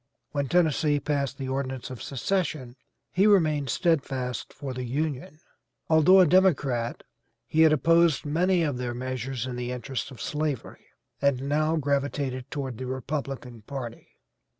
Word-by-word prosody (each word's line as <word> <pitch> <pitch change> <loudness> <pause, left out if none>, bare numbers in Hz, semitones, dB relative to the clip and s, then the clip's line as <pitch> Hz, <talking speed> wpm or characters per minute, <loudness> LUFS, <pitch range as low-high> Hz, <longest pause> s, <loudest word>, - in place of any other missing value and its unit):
When 140 -2 -1
Tennessee 155 -2 +2
passed 140 -2 -1
the 135 - -4
ordinance 130 -1 -3
of 125 - -8
secession 140 -4 -2 0.4
he 195 +3 +3
remained 155 -9 +3
steadfast 135 - -1
for 135 -2 -6
the 125 0 -4
Union. 145 +3 -3 0.5
Although 160 +5 +7
a - - +7
Democrat, 145 -9 +2 0.4
he 160 - +1
had 160 -1 +7
opposed 165 +1 +3
many 175 +4 +2
of 145 -5 -1
their 120 -1 -3
measures 130 0 -3
in 125 -1 -5
the 125 0 -3
interest 125 +2 -4
of 130 - -12
slavery, 150 -4 -3 0.3
and 140 -2 +2
now 155 +2 +2
gravitated 140 -3 -1
toward 135 -5 -4
the 130 - -4
Republican 130 -2 -4
party. 120 0 -7
140 Hz, 145 wpm, -27 LUFS, 130-155 Hz, 0.5 s, Although